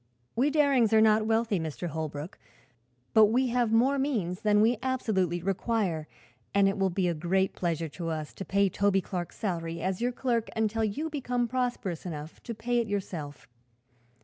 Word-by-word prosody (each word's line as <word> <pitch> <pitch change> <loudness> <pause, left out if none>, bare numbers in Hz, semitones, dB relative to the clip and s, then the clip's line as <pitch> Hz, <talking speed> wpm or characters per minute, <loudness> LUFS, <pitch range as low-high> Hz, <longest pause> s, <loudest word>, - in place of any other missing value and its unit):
We 265 +5 +3
Darings 280 -7 +3
are 220 - +7
not 215 0 +4
wealthy, 225 -3 +1
Mr. 160 +2 -4
Holbrook, 155 0 -5 0.7
but 220 -1 +8
we 250 +4 +2
have 240 -2 +1
more 260 +5 +3
means 210 -11 -1
than 210 -1 +3
we 225 +1 +3
absolutely 190 -10 0
require 195 -4 -1 0.5
and 200 -1 +5
it 195 0 -1
will 195 0 +2
be 180 0 0
a 175 - +1
great 180 +4 0
pleasure 165 -2 -2
to 165 +2 -5
us 155 -2 -4
to - - -6
pay 200 +1 +2
Toby 195 +1 +2
Clark's 175 -2 -5
salary 170 -5 -3
as 190 +2 -1
your 245 +1 +1
clerk 240 -2 -1
until 220 0 0
you 290 +10 -2
become 250 -4 -1
prosperous 240 -8 -2
enough 155 -3 -7
to 235 - -6
pay 240 +2 0
it 230 - -1
yourself. 170 -8 -5
205 Hz, 175 wpm, -28 LUFS, 175-235 Hz, 0.7 s, but